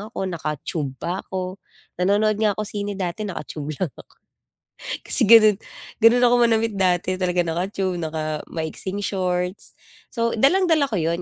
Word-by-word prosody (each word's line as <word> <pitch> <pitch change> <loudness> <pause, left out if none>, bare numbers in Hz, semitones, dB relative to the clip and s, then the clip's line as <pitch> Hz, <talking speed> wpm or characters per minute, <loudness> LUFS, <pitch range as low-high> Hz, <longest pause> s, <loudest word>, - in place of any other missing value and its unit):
ako, 205 -2 -5
naka-tube 150 -5 -4
pa 175 +7 -3
ako. 185 0 -6 0.4
Nanonood 205 +3 +2
nga 210 -2 +2
ako 215 - -2
sine 205 -1 -4
dati 190 +3 -3
naka-tube 155 -4 -6
lang 175 -3 -3
ako. - - -15 1.1
Kasi - - +6
gano'n 215 -3 +8 0.4
gano'n 235 +2 +6
ako 245 0 +4
manamit 225 -1 +2
dati 185 -2 +1
talagang 175 -2 0
naka-tube, 185 0 -2
naka-maiksing 160 +3 -4
shorts. 180 -1 -2 0.3
So, 230 -1 -1
dalang-dala 310 - +3
ko 215 - -1
'yon 170 +1 -1
190 Hz, 140 wpm, -22 LUFS, 175-215 Hz, 1.1 s, gano'n